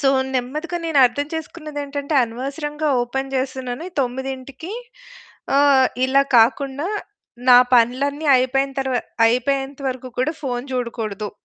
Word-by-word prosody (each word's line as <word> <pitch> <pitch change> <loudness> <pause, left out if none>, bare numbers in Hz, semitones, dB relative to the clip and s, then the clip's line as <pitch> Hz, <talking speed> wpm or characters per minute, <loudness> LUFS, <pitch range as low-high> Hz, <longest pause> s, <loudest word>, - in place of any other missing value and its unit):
So 275 - +3 0.3
నెమ్మదిగా 300 +8 -2
నేనర్థం 285 -3 +3
చేసుకున్నదేంటంటే 295 -2 -5
అనవసరంగా 295 +6 -4
open 270 +3 -4
చేస్తున్నాను. 260 +1 -3 0.2
9కి 265 +5 -5 0.8
ఆహ్, 280 -2 +5 0.2
ఇలా 270 +1 +4 0.2
కాకుండా 275 +6 +2 0.6
నా 245 -1 +10 0.2
పనులన్నీ 275 +6 +2
అయిపోయిన 270 +2 +1
తర్ 265 0 -1 0.4
అయిపోయేంత 270 +3 0
వరకు 255 0 -5
కూడా 260 +5 +1
ఫోను 245 -3 -3
జూడకూడదు 225 -5 -3
270 Hz, 105 wpm, -21 LUFS, 250-285 Hz, 0.8 s, నా